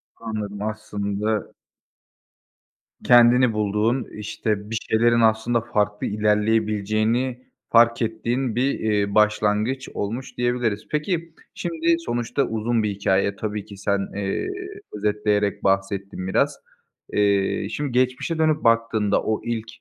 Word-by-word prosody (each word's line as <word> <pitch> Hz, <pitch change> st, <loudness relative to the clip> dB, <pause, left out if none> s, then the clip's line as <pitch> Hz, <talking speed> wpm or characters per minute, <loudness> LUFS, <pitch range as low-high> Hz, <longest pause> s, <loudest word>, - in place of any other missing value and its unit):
Anladım, 105 Hz, -3 st, -5 dB
aslında 105 Hz, 0 st, -3 dB, 1.5 s
Kendini 120 Hz, 0 st, +6 dB
bulduğun, 110 Hz, +4 st, 0 dB
işte, 105 Hz, 0 st, -3 dB
bir 115 Hz, -, -3 dB
şeylerin 115 Hz, +1 st, +3 dB
aslında 110 Hz, +1 st, +2 dB
farklı 105 Hz, -3 st, -1 dB
ilerleyebileceğini 110 Hz, +3 st, +1 dB, 0.3 s
fark 115 Hz, 0 st, +5 dB
ettiğin 115 Hz, +2 st, -1 dB
bir, 130 Hz, +3 st, +1 dB
iii, 105 Hz, -2 st, 0 dB
başlangıç 105 Hz, +4 st, +2 dB
olmuş 115 Hz, +6 st, -4 dB
diyebiliriz. 120 Hz, -4 st, -1 dB
Peki, 165 Hz, +2 st, -2 dB, 0.2 s
şimdi 165 Hz, 0 st, 0 dB
sonuçta 120 Hz, -2 st, -1 dB
uzun 115 Hz, 0 st, 0 dB
bir 105 Hz, -, 0 dB
hikâye, 100 Hz, 0 st, +1 dB
tabii 105 Hz, -1 st, -4 dB
ki 100 Hz, -, -11 dB
sen, 100 Hz, 0 st, -1 dB
eee, 100 Hz, -, -2 dB, 0.5 s
özetleyerek 105 Hz, -1 st, 0 dB
bahsettin 95 Hz, -1 st, -1 dB
biraz. 95 Hz, -, +1 dB, 0.6 s
Eee, 100 Hz, -1 st, +1 dB
şimdi 145 Hz, -2 st, -3 dB
geçmişe 125 Hz, +6 st, 0 dB
dönüp 155 Hz, -1 st, +2 dB
baktığında 115 Hz, -3 st, +2 dB
o 110 Hz, -, -1 dB
ilk 115 Hz, -1 st, -3 dB
110 Hz, 110 wpm, -23 LUFS, 105-120 Hz, 1.5 s, Kendini